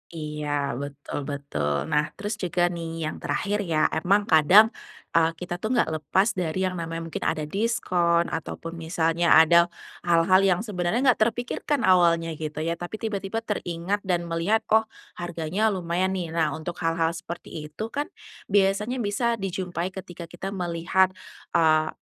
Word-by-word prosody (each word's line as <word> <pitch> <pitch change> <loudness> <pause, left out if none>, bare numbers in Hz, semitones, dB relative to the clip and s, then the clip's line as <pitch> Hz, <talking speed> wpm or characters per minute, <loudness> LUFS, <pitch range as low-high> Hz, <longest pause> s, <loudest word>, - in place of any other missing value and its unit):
Iya 150 -1 -5 0.3
betul 145 0 -6
betul. 140 - -2 0.2
Nah, 150 0 +3
terus 205 +1 -4
juga 175 -2 0
nih 170 -1 -5 0.2
yang 155 - -4
terakhir 205 +1 -1
ya, 155 -2 +2
emang 195 +6 +2
kadang, 190 +9 +7 0.4
eee, 165 0 +3
kita 175 0 -5
tuh 215 - -2
nggak 240 - +2
lepas 190 +7 +2
dari 180 0 -2
yang 185 -1 -1
namanya 165 0 -4
mungkin - - -4
ada 155 -1 0
diskon 175 -3 +1
ataupun 165 +1 -5
misalnya 165 +1 +2
ada 170 +2 +7 0.4
hal-hal 175 +2 +5
yang 180 -2 +3
sebenernya 210 +2 -1
nggak - - -3
terpikirkan 245 +4 -2
awalnya 170 -3 +4
gitu 155 0 -4
ya. 165 +1 -2
Tapi 175 +5 -5
tiba-tiba 220 +1 -3
teringat 190 -1 -2
dan 175 -2 +1
melihat, 170 +7 0
"Oh, 220 0 +4 0.3
harganya 175 +4 -1
lumayan 185 -1 0
nih." 175 -3 -3
Nah, 160 -4 0
untuk 170 +3 -6
hal-hal 165 -1 +1
seperti 165 -2 -7
itu 150 +8 -7
kan 290 +3 -2 0.4
biasanya 205 +5 +1
bisa 230 +3 0
dijumpai 185 -3 -3
ketika 180 -2 -8
kita 185 +4 -6
melihat, 180 +1 +1 0.4
eee, 155 -2 +3
175 Hz, 150 wpm, -25 LUFS, 165-195 Hz, 0.4 s, kadang